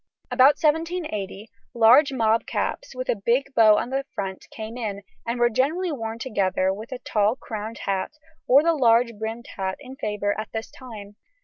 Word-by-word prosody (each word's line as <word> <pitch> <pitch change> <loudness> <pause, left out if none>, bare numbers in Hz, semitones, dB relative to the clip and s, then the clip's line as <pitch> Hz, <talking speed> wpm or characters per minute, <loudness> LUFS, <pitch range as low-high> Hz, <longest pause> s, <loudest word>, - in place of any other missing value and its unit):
About 275 +3 +6
1780 305 - -1 0.3
large 245 +6 +6
mob 225 -3 +1
caps - - -3
with 255 0 -4
a - - +2
big 270 +5 +1
bow 215 -3 +6
on 245 - -2
the 270 +1 -1
front 195 -2 -5
came 220 +1 -7
in, 205 -4 -4 0.2
and 235 +1 -2
were 240 - +5
generally 305 +10 0
worn 225 -5 -4
together 190 -5 0
with 215 +4 -8
the 255 - -5
tall 215 -2 +1
crowned 220 -3 -6
hat 195 +6 -1 0.3
or 275 +4 +6
the 335 0 +3
large 235 -4 +3
brimmed 225 +2 -5
hat 190 -1 -2
in 265 -1 -10
favour 210 -4 -2
at 215 - -6
this 225 0 -5
time. 210 -5 -11
230 Hz, 180 wpm, -24 LUFS, 210-265 Hz, 0.3 s, About